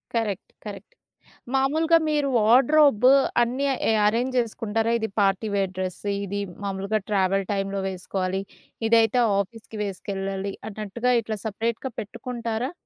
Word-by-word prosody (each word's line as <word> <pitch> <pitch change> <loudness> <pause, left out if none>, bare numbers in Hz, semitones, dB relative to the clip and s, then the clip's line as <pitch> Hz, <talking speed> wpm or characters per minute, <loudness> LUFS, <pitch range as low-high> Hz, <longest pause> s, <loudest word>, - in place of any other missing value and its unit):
Correct. 210 -4 -2
Correct. 205 -1 -9 0.6
మామూలుగా 315 +5 +3
మీరు 295 -2 +1
wardrobe 255 +2 +5 0.3
అన్నీ 250 +4 0 0.4
అరేంజ్ 240 +5 +1
చేసుకుంటారా? 225 -1 -1
ఇది 220 0 -2
పార్టీ 195 +2 +2
వేర్ 195 -2 0
డ్రెస్సు. 185 +2 -4 0.2
ఇది 200 +1 -3 0.2
మామూలుగా 200 +2 -1
ట్రావెల్ 195 -1 +1
టైమ్‌లో 195 0 -2
వేసుకోవాలి. 185 0 -3 0.5
ఇదైతే 225 +1 +4 0.2
ఆఫీస్‌కి 220 +2 -6
వేసుకెళ్ళాలి 195 0 -4 0.2
అన్నట్టుగా 215 +4 -2
ఇట్లా 215 -1 -4
సెపరేట్‌గా 230 +4 -2
పెట్టుకుంటారా? 235 +3 -4
215 Hz, 110 wpm, -25 LUFS, 195-240 Hz, 0.6 s, wardrobe